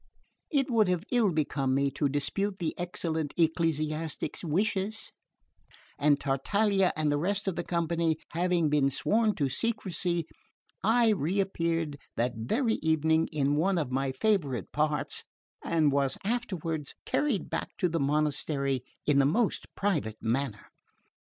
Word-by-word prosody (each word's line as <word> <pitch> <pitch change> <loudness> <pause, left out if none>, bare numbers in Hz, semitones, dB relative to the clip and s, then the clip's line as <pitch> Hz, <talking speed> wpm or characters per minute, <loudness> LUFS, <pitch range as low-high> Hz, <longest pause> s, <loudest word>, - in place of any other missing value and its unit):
It 275 -3 +1
would 220 -4 +4
have 180 -1 0
ill 235 -6 +3
become 140 -4 0
me 140 0 +2
to 145 0 0
dispute 190 +8 -1
the 165 -4 -2
excellent 160 -3 -3
ecclesiastic's 160 -1 0
wishes, 195 +5 -1 0.9
and 145 0 +4
Tartaglia 195 +8 +2
and 155 -1 +1
the 145 - +1
rest 200 +5 -1
of 190 - 0
the 175 - -2
company 170 -2 0
having 175 -1 +1
been 145 -2 +3
sworn 215 - +1
to 140 - +1
secrecy, 180 - -1 0.6
I 230 +2 +4
reappeared 170 -5 0 0.2
that 120 +1 +1
very 220 - 0
evening 160 0 +2
in 145 -2 0
one 185 +4 +2
of 145 -6 -1
my 135 +1 0
favourite 140 - 0
parts, 150 -1 0 0.4
and 160 -3 +2
was 140 -1 +1
afterward 185 - -2
carried 280 -10 0
back - - -2
to 180 - +2
the 165 -1 -1
monastery 140 -2 0 0.2
in 145 -2 +4
the 135 - +5
most 215 +8 +1
private 150 - -1
manner. 115 -1 -2
160 Hz, 140 wpm, -29 LUFS, 145-195 Hz, 0.9 s, the